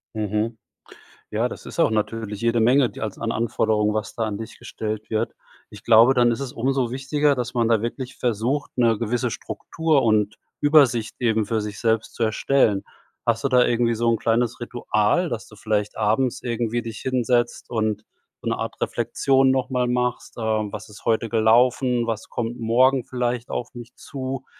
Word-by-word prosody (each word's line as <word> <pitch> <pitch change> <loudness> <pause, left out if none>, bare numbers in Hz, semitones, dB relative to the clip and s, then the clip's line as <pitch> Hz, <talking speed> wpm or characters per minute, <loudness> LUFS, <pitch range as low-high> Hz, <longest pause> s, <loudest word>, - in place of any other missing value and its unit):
Mhm. 110 +2 -1 0.7
Ja, - - 0
das - - -9
ist - - -10
auch - - +4
natürlich 110 -1 -2
jede 115 0 +1
Menge, 125 +2 +4
die - - -11
als 105 -3 -4
an 115 0 -2
Anforderungen, 110 -2 +1
was 110 -1 -3
da 115 - -1
an 105 -2 -3
dich 115 0 -8
gestellt 110 0 -5
wird. 110 +1 -1 0.4
Ich 105 +2 -13
glaube, 115 +3 +7
dann 120 -2 +3
ist 115 - -3
es 135 -3 -5
umso 130 0 0
wichtiger, 140 +2 +1
dass 125 0 -3
man 115 -1 +2
da 115 -2 +2
wirklich 125 +2 -5
versucht, 120 +5 -1
'ne 115 -4 +3
gewisse 120 +1 -1
Struktur 160 -4 -1
und 105 -2 +1 0.2
Übersicht 140 -7 +4
eben 110 -3 +1
für 110 -1 0
sich 105 -1 -6
selbst 115 -1 0
zu 115 - 0
erstellen. 110 -2 +2 0.4
Hast 115 0 0
du - - +3
da 125 -1 +5
irgendwie 120 -1 +2
so 115 +1 +1
'n 115 - +2
kleines 115 +1 0
Ritual, 120 - 0
dass 120 -6 -5
du 110 - -15
vielleicht 105 0 -2
abends 115 +4 0
irgendwie 120 -1 -1
dich 115 -2 -7
hinsetzt 125 -2 0
und 110 -2 -1 0.4
so - - -3
'ne - - -1
Art - - -5
Reflexion 135 -1 +2
nochmal 125 -1 0
machst, 125 0 -1
ähm, 110 -2 -1
was - - -7
ist 105 - -14
heute 115 0 +1
gelaufen, 120 +2 +3
was 115 0 -3
kommt 120 +1 -4
morgen 125 +3 +3
vielleicht 125 -1 -2
auf 120 - -4
mich 120 0 -10
zu? 130 -1 -6
115 Hz, 185 wpm, -23 LUFS, 110-125 Hz, 0.7 s, glaube